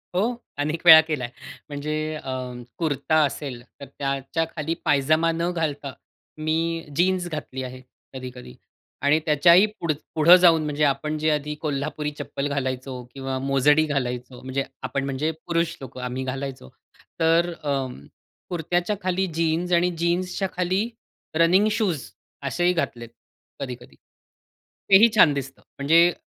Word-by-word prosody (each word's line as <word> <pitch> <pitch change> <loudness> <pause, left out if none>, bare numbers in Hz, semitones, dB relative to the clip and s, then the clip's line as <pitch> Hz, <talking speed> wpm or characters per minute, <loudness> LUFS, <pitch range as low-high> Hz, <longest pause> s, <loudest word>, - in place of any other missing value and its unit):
हो, 185 - +3 0.4
अनेक 155 +3 -1
वेळा 160 -1 +12
केला 150 -5 -2
आहे. 120 - -6 0.4
म्हणजे 145 +1 -4 0.2
अ, 135 -3 -6 0.5
कुर्ता 155 -1 0
असेल, 135 -3 -5 0.2
तर 140 - -8
त्याच्याखाली 150 +4 -2
पायजामा 155 +4 +3
न 170 +2 -1
घालता 145 -4 -2 0.5
मी 165 +1 0
जीन्स 180 +1 +2
घातली 135 -4 -5
आहे 130 0 -8 0.3
कधी-कधी. 125 - -9 0.5
आणि 145 +2 +3
त्याच्याही 170 +5 +6
पुढंचं 155 -3 -2
पुढं 165 +3 +8
जाऊन 170 -3 +5
म्हणजे 150 0 -1
आपण 150 +2 0
जे 155 +1 +1
आधी 150 0 -1
कोल्हापुरी 150 0 -2
चप्पल 140 - -3
घालायचो 130 -2 -3
किंवा 135 -1 -4
मोजडी 140 +3 +3
घालायचो. 125 -3 -3
म्हणजे 130 +1 -2 0.2
आपण 140 - -2
म्हणजे 140 +4 -1 0.2
पुरुष 170 -1 0
लोकं 130 -1 -8
आम्ही 125 +1 -3
घालायचो. 130 - -5 0.5
तर 165 +2 +3
अ, 145 -1 0 0.8
कुर्त्याच्या 175 +3 -1
खाली 185 +1 +1
जीन्स 165 +2 0
आणि 175 +1 +4
जीन्सच्या 180 +3 0
खाली 185 +5 0 0.5
रनिंग 180 +6 +4
शूज 190 - -1 0.4
असेही 175 +5 +1
घातले 120 -8 -2
आहेत 115 - -18 0.5
कधी-कधी. 125 -3 -7 0.9
तेही 200 +4 +8
छान 155 -8 +7
दिसतं. 135 -1 -6 0.2
म्हणजे 165 +5 +5
150 Hz, 135 wpm, -24 LUFS, 135-170 Hz, 0.9 s, वेळा